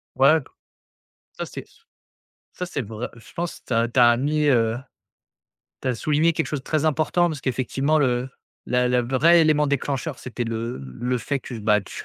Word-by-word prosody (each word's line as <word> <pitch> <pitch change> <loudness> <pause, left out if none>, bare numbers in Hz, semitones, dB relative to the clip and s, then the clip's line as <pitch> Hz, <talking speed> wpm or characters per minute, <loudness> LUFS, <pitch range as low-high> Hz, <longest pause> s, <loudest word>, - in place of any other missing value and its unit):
Ouais, 140 +4 +5 1.0
ça - - -3
c'est - - -8
ce - - -25 0.7
ça 180 - -4
c'est 175 -5 -4
vrai 110 +1 -5
je 115 - -16
pense 175 0 -4
tu 125 - -2
as 115 +1 +3
tu 120 +2 +1
as 120 -1 +6
mis, 150 +4 0
heu, 115 -3 +2 1.0
tu - - -2
as 125 - +1
souligné 150 +7 +2
quelque 160 - 0
chose 145 -3 -4
très 155 0 -1
important 160 +3 +2
parce 155 -4 -5
qu'effectivement 135 +3 0
le 125 -2 +1 0.4
la 125 0 +2
la 125 0 +3
vrai 135 +8 +4
élément 155 -2 +3
déclencheur, 140 +1 -2
c'était 125 -1 -5
le 115 +1 -3
le 120 - -3
fait 140 +3 -2
que, 125 - -8
bah, 105 0 +3
tu 95 - -11
130 Hz, 185 wpm, -23 LUFS, 120-155 Hz, 1.0 s, as